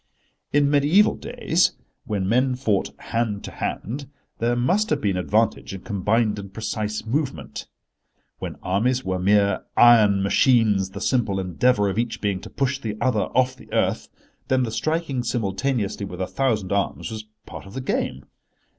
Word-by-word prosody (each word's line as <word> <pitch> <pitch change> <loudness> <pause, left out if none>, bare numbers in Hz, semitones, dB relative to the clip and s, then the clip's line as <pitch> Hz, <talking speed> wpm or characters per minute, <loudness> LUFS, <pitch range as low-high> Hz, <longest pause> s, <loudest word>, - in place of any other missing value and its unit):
In 145 0 +4
mediæval 150 +8 +4
days, - - +1 0.3
when 100 -3 -2
men 125 +4 +2
fought 110 -6 0
hand 115 -3 -2
to - - -7
hand, 135 +6 -4 0.3
there 120 +1 +1
must 185 - +1
have - - +1
been 100 -3 0
advantage 105 +2 0
in 95 - -8
combined 105 +2 0
and 100 -1 -8
precise 110 0 -3
movement. 135 +4 -3 0.7
When - - -5
armies 120 +8 +1
were 95 -1 -1
mere 100 +1 +3
iron 105 -5 +6
machines, 105 -3 +3
the 100 +1 -8
simple 115 -7 +1
endeavour 100 +4 +2
of 100 +3 -1
each 120 -1 -2
being 100 -3 -1
to - - -9
push 135 -1 -1
the 110 -5 -4
other 120 -4 +1
off 130 0 +3
the - - -17
earth, - - 0 0.4
then 130 -1 +2
the 115 - -2
striking 155 0 -1
simultaneously 110 -2 -1
with 90 - -8
a 95 - 0
thousand 110 -6 -1
arms 100 +3 -1
was 110 -1 -6 0.2
part - - -9
of 95 - -12
the - - -2
game. 65 - -2
110 Hz, 165 wpm, -23 LUFS, 100-130 Hz, 0.7 s, iron